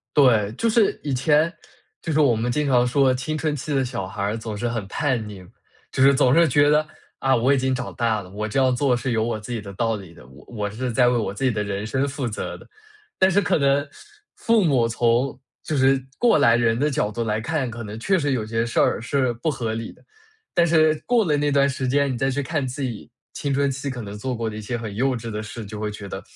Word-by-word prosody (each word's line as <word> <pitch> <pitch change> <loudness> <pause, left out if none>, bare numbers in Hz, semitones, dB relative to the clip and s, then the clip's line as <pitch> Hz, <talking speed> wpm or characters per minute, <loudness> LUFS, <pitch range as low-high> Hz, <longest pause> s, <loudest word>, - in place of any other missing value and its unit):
对， 115 -8 +4
就 230 - +1
是 220 -2 +2
以 145 - -2
前 150 +5 +2 0.5
就 165 - -3
是 155 - +1
我 135 -6 +4
们 115 +2 -1
经 150 +3 0
常 125 -2 +4
说， 130 +1 +3
青 145 +5 -3
春 155 -1 -1
期 145 +2 -4
的 135 - +1
小 120 -7 -4
孩 100 - -7
儿 105 +3 -1
总 110 -2 -6
是 120 +3 -2
很 115 -3 -3
叛 125 -2 -1
逆， 100 -3 -9 0.5
就 - - -1
是 140 +1 +7
总 130 -1 +3
是 170 +2 +5
觉 145 +1 +4
得， 150 +1 +3 0.3
啊， 135 0 +2
我 125 +4 +3
已 - - +2
经 130 0 0
长 130 - -4
大 115 -3 0
了， 90 - -12
我 105 +2 -4
这 110 +5 -1
样 130 -1 +3
做 125 -1 +2
是 125 +2 -3
有 110 -2 +1
我 115 -1 -2
自 110 +4 -9
己 115 - -3
的 100 -1 -9
道 115 +3 0
理 95 -5 -10
的， 65 - -16
我 65 +1 -16
我 105 -4 -4
是 120 +4 -4
在 125 +2 +3
为 125 - +3
我 110 -3 -2
自 100 - -6
己 130 - +3
的 105 -2 -2
人 100 0 -4
生 130 +5 0
负 140 -2 -3
责 110 - -5
的。 - - -16 0.5
但 190 - +4
是 195 +2 +3
可 180 - +1
能 140 -1 +2 0.5
父 230 -2 +2
母 130 -8 +3
从 120 +3 +1 0.3
就 155 - -2
是 135 0 +3
过 240 -6 +4
来 115 -5 +5
人 115 -1 +1
的 150 +2 +2
角 110 -7 -1
度 115 +2 -3
来 110 -1 -1
看， 140 +2 -2
可 120 0 -7
能 105 +1 -7
确 190 +11 +2
实 145 -4 0
有 120 -5 -1
些 115 +1 -1
事 115 - -1
儿 - - +2
是 130 +1 0
不 120 +7 -2
合 115 -5 -3
理。 115 0 -5 0.6
但 170 - +4
是 155 -1 +4
过 240 -2 +3
了 150 -6 +1
那 145 0 +1
段 140 0 +3
时 130 -1 -3
间， 140 +1 +2
你 125 - -3
再 135 +2 0
去 145 +2 -1
看 145 0 -2
自 130 +3 -6
己 120 -4 -5 0.2
青 140 -1 -2
春 140 +1 +2
期 140 +1 -4
可 125 -2 -5
能 105 -1 -7
做 125 +4 -3
过 115 -1 -2
的 105 - -8
一 - - -6
些 120 +3 -3
很 110 -3 -6
幼 130 +3 +1
稚 115 -1 -6
的 105 0 -4
事， 110 +1 -8
就 105 +1 -8
会 105 0 -2
觉 105 -1 -8
得， - - -6
125 Hz, 285 characters per minute, -23 LUFS, 110-140 Hz, 0.6 s, 是